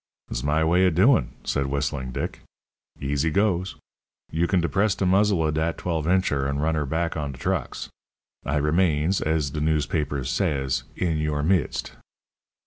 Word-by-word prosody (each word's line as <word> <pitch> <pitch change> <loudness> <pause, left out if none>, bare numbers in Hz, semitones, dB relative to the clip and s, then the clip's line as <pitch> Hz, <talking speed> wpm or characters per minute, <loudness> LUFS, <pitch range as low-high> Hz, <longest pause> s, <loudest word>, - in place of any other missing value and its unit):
"It's - - -2
my 75 +3 +1
way 90 +3 +4
of 85 - 0
doin'," 95 - +4
said 70 - -1
Whistling 70 -2 -2
Dick. - - -4 0.6
"Easy 70 +3 0
goes. 95 0 +1 0.6
You 85 +2 +1
can 95 - +2
depress 95 +5 +1
de 100 - -1
muzzle 95 -2 +3
of 75 - 0
dat 80 +1 -1
twelve 80 -3 -2
incher, 80 -7 +1
and 70 0 -2
run 80 +2 +1
'er 75 -2 -1
back 80 +3 -1
on 75 -3 -3
de - - -11
trucks. 90 -1 -2 0.6
I 70 - -1
remains, 80 +3 +2
as 80 -3 0
de 75 - -3
newspapers 75 -3 0
says, 65 -2 0
'in 80 -4 0
yer 75 -1 -1
midst.'" 90 +3 0
80 Hz, 165 wpm, -25 LUFS, 70-90 Hz, 0.6 s, way